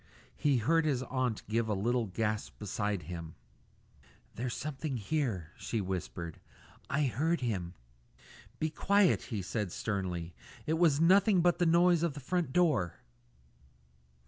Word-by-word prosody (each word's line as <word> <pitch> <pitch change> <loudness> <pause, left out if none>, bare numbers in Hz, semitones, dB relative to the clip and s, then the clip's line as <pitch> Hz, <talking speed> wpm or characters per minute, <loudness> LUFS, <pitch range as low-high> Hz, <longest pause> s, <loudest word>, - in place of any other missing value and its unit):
He 145 -3 +2
heard 165 +8 +3
his 135 -5 0
aunt 130 -3 -2
give 110 +1 0
a 105 - +1
little 115 +3 0
gasp 105 +2 -2
beside 105 -2 -2
him. 85 -1 -7 1.0
"There's 120 +1 -3
someone 145 -2 -3
here," 110 - -2
she 115 - -2
whispered; 85 -4 -4 0.5
"I 150 +2 +1
heard 155 +6 0
him." 95 -8 -2 0.8
"Be 155 0 -1
quiet!" 200 +3 +3
he 105 -6 -3
said 105 0 -2
sternly. 90 -5 -3 0.3
"It 160 +1 0
was 155 -5 +4
nothing 190 +3 +5
but 175 0 +3
the 175 - +3
noise 170 0 +5
of 170 -4 0
the - - -6
front 165 +1 -1
door." 145 - +1
125 Hz, 140 wpm, -32 LUFS, 100-160 Hz, 1.0 s, nothing